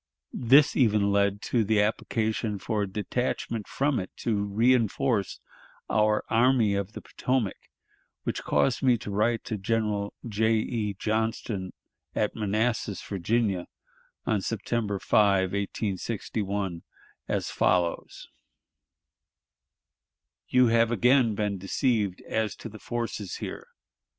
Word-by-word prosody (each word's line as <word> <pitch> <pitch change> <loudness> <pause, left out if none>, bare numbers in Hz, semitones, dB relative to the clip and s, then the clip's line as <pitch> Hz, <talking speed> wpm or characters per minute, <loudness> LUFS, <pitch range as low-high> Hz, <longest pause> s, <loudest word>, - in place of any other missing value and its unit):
This 135 +4 +5
even 105 -5 +3
led 100 0 +1
to 120 -3 +1
the 105 +1 +2
application 110 0 0
for 105 +2 -2
a 100 - 0
detachment 110 +2 -2
from 140 0 0
it 95 - -5
to 115 - 0
reënforce 115 0 +2 0.5
our 105 0 +2
Army 115 -2 +3
of 100 +1 -2
the - - -8
Potomac, 125 -6 -2 0.5
which - - -2
caused 130 - +1
me 125 -3 +4
to 105 - -7
write 115 +3 +1
to 110 - -4
General 105 -1 -1
J. 110 +1 +1
E. 110 -2 -1
Johnston 110 -3 -2 0.4
at 105 - 0
Manassas, 110 0 -1
Virginia, 100 -1 -1 0.6
on 110 -4 +1
September 110 0 -2
5, 95 -2 +3
1861, 100 -2 -3 0.5
as - - -1
follows: 90 -2 0 2.2
"You 125 -1 +4
have 115 0 +3
again 120 0 +4
been 100 -2 -1
deceived 100 -1 0
as 110 -1 -2
to 115 - -8
the 110 0 -11
forces 115 -5 -4
here. - - -6
110 Hz, 115 wpm, -27 LUFS, 100-115 Hz, 2.2 s, This